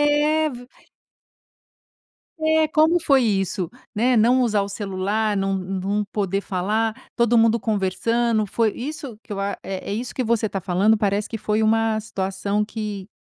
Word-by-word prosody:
É 300 +1 +2
ver 245 -1 -10 1.7
É, 315 0 +2
como 320 +3 +3
foi 275 -4 +4
isso, 195 -4 0 0.2
né, 245 +4 +2
não 245 +3 +4
usar 215 -4 +2
o 200 - -2
celular, 205 +2 -1
não 195 0 0
não 195 +2 -2
poder 200 -1 -1
falar, 215 +4 -1 0.2
todo 235 0 +3
mundo 225 0 +4
conversando, 220 +2 0
foi 215 +2 0
isso 275 -3 -6
que - - -9
eu 195 - -3
a, 200 0 -2
é 190 -1 -6
é - - -1
isso 240 +3 -4
que 255 - -1
você 230 -1 +1
tá 195 -2 -3
falando 195 +5 +2
parece 205 0 0
que 225 - -4
foi 215 +1 0
uma 225 0 +2
situação 200 0 -2
que 210 -3 -5
215 Hz, 165 wpm, -22 LUFS, 200-235 Hz, 1.7 s, foi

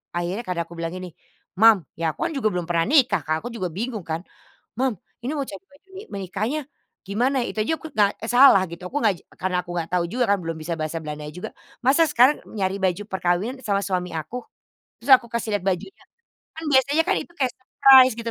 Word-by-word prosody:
akhirnya 175 +6 -2
kan 180 - -2
aku 170 +1 -14
bilang 165 0 -3
gini, 185 0 -6 0.5
"Mom," 220 -4 +6 0.2
ya 165 -1 +1
aku - - -37
kan 335 - -6
juga 255 -5 +1
belum 180 -1 -1
pernah 165 -1 +2
nikah 250 - +4
Kak, 155 +1 +1
aku 240 - -4
juga 185 -5 -2
bingung 215 +1 -4
kan. 160 +1 -3 0.6
"Mom, 260 -2 +1 0.3
ini 245 - -3
mau 275 - -2
cari 195 -2 -9
baju 295 +7 -24
ni 390 - -7
menikahnya 200 - -2 0.5
gimana?" 245 +7 +1
Itu - - -7
aja 320 +9 0
aku - - -9
na 210 - +7
eee, 225 - -6
salah 250 -6 +8
gitu 170 - -9
aku 290 - -1
ngaj 210 -4 +3 0.2
karena 185 -1 -1
aku 175 - -12
enggak 165 - -3
tahu 175 -1 +2
juga 250 0 +1
kan 200 - -2
belum 165 -1 -4
bisa 170 +2 -3
bahasa 155 +1 -2
Belanda 150 -1 -6
juga. 180 +4 -7 0.4
Masa 280 +5 +5
sekarang 255 +5 +5 0.2
nyari 190 0 0
baju 185 +1 +1
perkawinan 190 +7 -1
sama 200 -2 +1
suami 180 -2 -2
aku. 160 +10 -6 0.6
Terus 280 - -5
aku 250 - -13
kasih 235 -1 -2
lihat 200 - -7
bajunya, 190 - -4 0.5
kan 325 - -6
biasanya 280 +4 +4
kan - - +3
itu 345 - -18
kayak 260 -2 +1
surprise 260 0 +6
gitu 230 0 -4
205 Hz, 215 wpm, -23 LUFS, 175-255 Hz, 0.6 s, salah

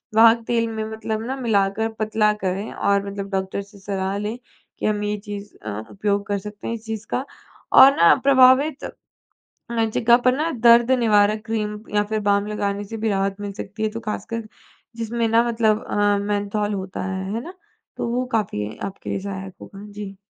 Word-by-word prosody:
वाहक 225 +1 +7
तेल 230 -1 +1
में 220 -1 -3
मतलब 220 0 -3
ना 265 +2 -3
मिलाकर 215 -1 +1
पतला 215 0 +2
करें 195 +1 -3
और 200 0 +1
मतलब 200 0 -6
डॉक्टर 190 +1 -2
से 200 0 -15
सलाह 195 0 -2
लें 210 +3 -3 0.4
कि - - -3
हम 210 -1 0
ये 210 0 -1
चीज़ 205 -1 -7
अ, 110 0 -4
उपयोग 200 0 -1
कर 205 0 0
सकते 210 +1 -8
हैं 230 - -2
इस 225 0 -11
चीज़ 220 -1 -5
का? 260 - -1 0.5
और 270 +1 +9
ना 170 - +7
प्रभावित 270 +2 +5 1.1
जगह 235 +1 +5
पर 250 +1 +2
ना 315 +3 0 0.2
दर्द 235 +1 +7
निवारक 215 -1 +3
क्रीम 210 -2 -2 0.2
या 205 0 +3
फिर 215 -1 0
बाम 200 0 +2
लगाने 205 -1 -2
से 225 +3 -7
भी 220 0 -1
राहत 195 -1 0
मिल 205 -1 -4
सकती 205 +2 -7
है, 215 - +2
जो 230 +2 -6
ख़ासकर 220 +1 -5 0.5
जिसमें 230 0 -1
ना 230 +1 +4
मतलब 225 -1 +1
अ, 205 0 +2
मेन्थॉल 205 +1 -1
होता 190 -1 -5
है। 190 0 -3
है 230 - -2
ना? 360 +3 -9 0.4
तो - - -2
वो 245 +2 0
काफ़ी 110 - -1
आपके 195 0 -6
लिए - - -1
सहायक 190 -1 -6
होगा। 200 +1 -11
जी। 200 -1 -8
210 Hz, 190 wpm, -22 LUFS, 200-225 Hz, 1.1 s, और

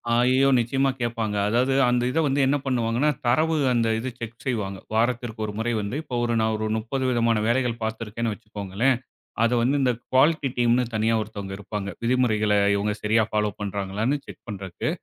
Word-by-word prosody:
அய்யய்யோ! 130 +3 +4
நிச்சயமா 135 +4 +1
கேப்பாங்க. 115 -3 -1
அதாவது 125 +4 +2 0.2
அந்த 125 0 +2
இதை 160 - +1
வந்து 140 +1 +1
என்ன 145 +2 +2
பண்ணுவாங்கன்னா, 120 +2 +1 0.2
தரவு 155 +7 +3 0.2
அந்த 115 -1 +2
இது 130 +3 -3
செக் 115 0 -8
செய்வாங்க. 105 -7 -2 0.2
வாரத்திற்கு 120 0 0
ஒரு 105 - -5
முறை 115 +2 -1
வந்து 100 +4 -4
இப்ப 125 -5 -4
ஒரு 120 0 0
நான் 110 0 +1
ஒரு 110 - -2
30 125 +5 -3
விதமான 115 -2 +2
வேலைகள் 120 -1 0
பாத்துருக்கேன்னு 110 0 -3
வச்சுக்கோங்களேன், 105 +3 -1 0.5
அதை 115 +1 +3
வந்து 130 +4 +2
இந்தக் 125 -3 0
குவாலிட்டி 145 +2 +3
டீம்ன்னு 120 +1 +3
தனியா 110 +1 +2
ஒருத்தவங்க 100 -2 -6
இருப்பாங்க. 100 0 -5
விதிமுறைகள 115 -4 +2 0.2
இவங்க 105 +1 0
சரியா 110 +1 +3
ஃபாலோ 105 -1 +1
பண்றாங்களான்னு 100 +6 -1
செக் - - -12
பண்றதுக்கு, 95 -4 -4
115 Hz, 170 wpm, -24 LUFS, 105-125 Hz, 0.5 s, அய்யய்யோ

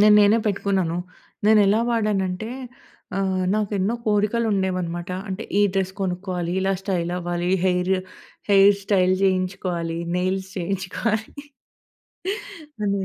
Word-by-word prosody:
నేను 210 0 +7
నేనే 205 +2 +5
పెట్టుకున్నాను. 195 -4 0 0.5
నేనెలా 210 0 +5
వాడానంటే, 210 -3 0 0.7
ఆహ్, 190 -1 0
నాకెన్నో 210 0 0
కోరికలు 215 +2 +2
ఉండేవన్నమాట. 185 -2 -1 0.2
అంటే 195 +4 -4 0.2
ఈ - - +5
డ్రెస్ 190 -1 0
కొనుక్కోవాలి 180 -2 -2
ఇలా 195 +1 +1
స్టైల్ 180 -3 -1
అవ్వాలి 175 0 -2
ఈ - - +3
హెయిర్, 180 +1 +2 0.6
హెయిర్ 200 0 +7
స్టైల్ 185 -2 +3
జేయించుకోవాలి 185 -3 0 0.2
నెయిల్స్ 190 +1 -1
జేయించుకోవాలి 195 +4 -2 1.5
అని. 200 -1 0
190 Hz, 110 wpm, -23 LUFS, 180-205 Hz, 1.5 s, నేను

